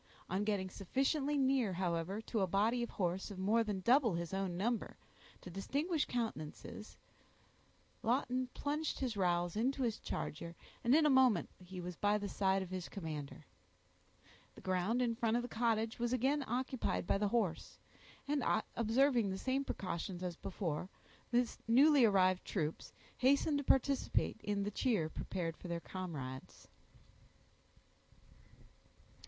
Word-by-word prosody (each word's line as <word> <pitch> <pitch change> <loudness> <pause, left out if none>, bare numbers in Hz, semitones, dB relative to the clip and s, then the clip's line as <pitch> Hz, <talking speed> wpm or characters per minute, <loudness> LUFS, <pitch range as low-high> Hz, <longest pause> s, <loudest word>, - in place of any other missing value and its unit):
On 190 +3 +1
getting 200 -3 -1
sufficiently 275 - 0
near, 260 -7 +2
however, 180 +2 -1
to 225 0 -2
a 190 - +2
body 215 +6 +2
of 235 - -2
horse 185 +1 -2
of 200 - -8
more 210 +5 +3
than 205 -3 -3
double 240 - +4
his 170 0 -4
own 190 -2 -1
number, 230 +4 -1 0.4
to 180 - -9
distinguish 290 - -1
countenances, 215 -2 -5 1.0
Lawton 255 +1 0
plunged 300 +2 -2
his 250 -5 -2
rowels 175 -2 +1
into 260 +5 +1
his 230 -3 -1
charger, 170 +3 -5 0.3
and 240 +4 +5
in 315 0 +5
a - - +5
moment 255 -9 +4
he 180 0 -8
was 180 0 -5
by 205 +3 +2
the 205 -1 -3
side 190 -1 +1
of 185 - -10
his 185 -2 -4
commander. 155 -6 -6 1.1
The - - -12
ground 185 +7 +1
in 235 -1 +1
front 230 0 +1
of 240 - -1
the - - -4
cottage 225 -1 0
was 240 0 0
again 270 +4 +2
occupied 255 -2 -1
by 195 - +1
the 210 - +2
horse; 200 -6 -1 0.5
and 285 -2 0 0.3
observing 235 0 +3
the 190 - -2
same 265 +6 0
precautions 180 -5 -4
as 180 -2 -3
before, 175 -2 -3 0.4
the 245 0 +3 0.2
newly 275 +3 +6
arrived 185 -3 +3
troops 160 -5 -3 0.3
hastened 280 +3 +3
to - - -3
participate 270 -4 +2
in 205 -1 0
the 205 - -2
cheer 205 -8 +1
prepared 165 0 -4
for - - -9
their 170 -1 -2
comrades. 150 -9 -7
210 Hz, 150 wpm, -36 LUFS, 185-250 Hz, 1.1 s, newly